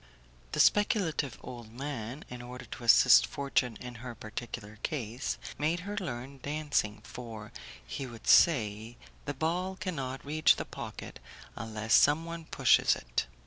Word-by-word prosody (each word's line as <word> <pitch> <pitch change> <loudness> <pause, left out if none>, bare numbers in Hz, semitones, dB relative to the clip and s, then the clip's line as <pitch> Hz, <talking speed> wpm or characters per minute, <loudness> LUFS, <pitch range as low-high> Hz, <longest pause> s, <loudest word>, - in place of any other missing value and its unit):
The - - -1
speculative 185 - +3
old 120 -3 -9
man, 130 0 -5
in 125 0 -8
order 125 +1 -9
to 120 - -9
assist 115 - +7
fortune 135 -4 -1
in 125 -1 -7
her 120 -1 -7
particular 110 0 -7
case, 125 -2 -3 0.2
made 160 +4 +1
her 205 +3 -5
learn 135 - -5
dancing, 145 -8 -1
for, 115 -2 -8 0.3
he 130 - -5
would 115 -2 -11
say, 115 -6 +4 0.3
the 145 -1 -3
ball 175 +6 -1
cannot 135 -10 -4
reach 155 +2 +4
the - - -4
pocket - - -8 0.4
unless 110 -1 -2
someone 165 +3 +3
pushes - - +4
it. - - -2
125 Hz, 140 wpm, -31 LUFS, 115-155 Hz, 0.4 s, assist